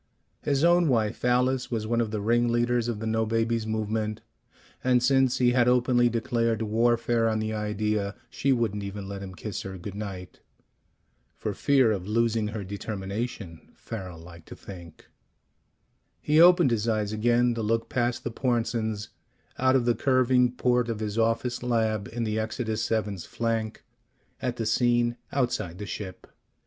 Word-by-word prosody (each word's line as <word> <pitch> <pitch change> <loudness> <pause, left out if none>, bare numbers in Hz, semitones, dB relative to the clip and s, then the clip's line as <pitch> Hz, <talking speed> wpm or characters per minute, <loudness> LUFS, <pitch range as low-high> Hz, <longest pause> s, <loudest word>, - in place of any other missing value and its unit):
His 140 0 0
own 175 0 +5
wife, 110 -6 0
Alice, 125 +1 +2
was 110 -3 -2
one 115 +1 +1
of 115 - -1
the 105 -1 -3
ringleaders 120 +1 +2
of 120 -3 -2
the 110 - -5
"no 110 0 +1
babies" 115 0 0
movement, 110 0 -2 0.6
and 125 -1 +3
since 135 -1 +3
he 125 -1 +3
had 120 -1 +3
openly 125 -1 +3
declared 115 -1 0
warfare 115 +1 +2
on 110 - 0
the 110 0 -2
idea, 105 -1 -1
she 140 - -1
wouldn't 115 -5 0
even 100 0 -6
let 100 0 -6
him 95 -2 -8
kiss 100 0 -5
her 95 -1 -7
good 90 +3 -7
night. 95 -3 -7 1.0
(For - - -4
fear 135 -5 +3
of 95 -3 -3
losing 115 0 +1
her 105 -1 -5
determination, 100 -2 -5
Farrel 95 -6 -7
liked 85 0 -13
to - - -9
think.) 85 -5 -12 1.1
He 155 +2 +3
opened 175 -5 +6
his 115 -1 0
eyes 110 -2 0
again 120 +2 +2
to 115 - -3
look 115 +1 0
past 120 -1 -1
the 120 - -3
Pornsens, 115 -3 -1 0.5
out 130 0 +4
of 125 -3 +2
the 120 - +3
curving 130 -1 +3
port 125 -1 +1
of 115 -2 -3
his 110 0 -2
office 115 +2 0
lab 110 -4 0
in 120 +1 -4
the 110 0 -1
Exodus 110 0 -2
VII's 105 -5 -1
flank, 115 -2 -2 0.6
at 125 -2 -2
the 115 - -3
scene 120 +1 +2
outside 120 -10 -1
the 105 - -6
ship. 95 -2 -7
115 Hz, 165 wpm, -27 LUFS, 105-120 Hz, 1.1 s, opened